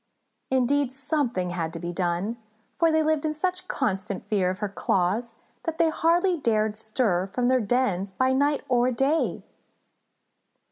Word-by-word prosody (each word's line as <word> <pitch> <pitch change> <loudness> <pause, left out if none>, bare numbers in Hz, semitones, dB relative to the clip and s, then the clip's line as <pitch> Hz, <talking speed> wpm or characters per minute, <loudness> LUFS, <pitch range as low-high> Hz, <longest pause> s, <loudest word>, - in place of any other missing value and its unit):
Indeed, 260 +1 +2
something 265 - -1
had 165 -2 -2
to 165 - -5
be 175 +1 -4
done, 180 +5 -1 0.4
for 330 -1 +4
they 315 0 +3
lived 310 -1 +1
in 310 -1 0
such 365 +3 -2
constant 200 -5 -2
fear 195 -4 +1
of 185 - -3
her 210 - -2
claws 200 +4 -1 0.3
that 330 -1 -2
they 330 - +4
hardly 345 +3 +2
dared 215 -5 +1
stir 215 -4 0
from 245 +6 0
their 255 -1 +3
dens 205 -4 0
by 260 +7 +1
night 285 +2 +1
or 245 0 +3
day. 275 +6 0
245 Hz, 155 wpm, -26 LUFS, 195-290 Hz, 0.4 s, for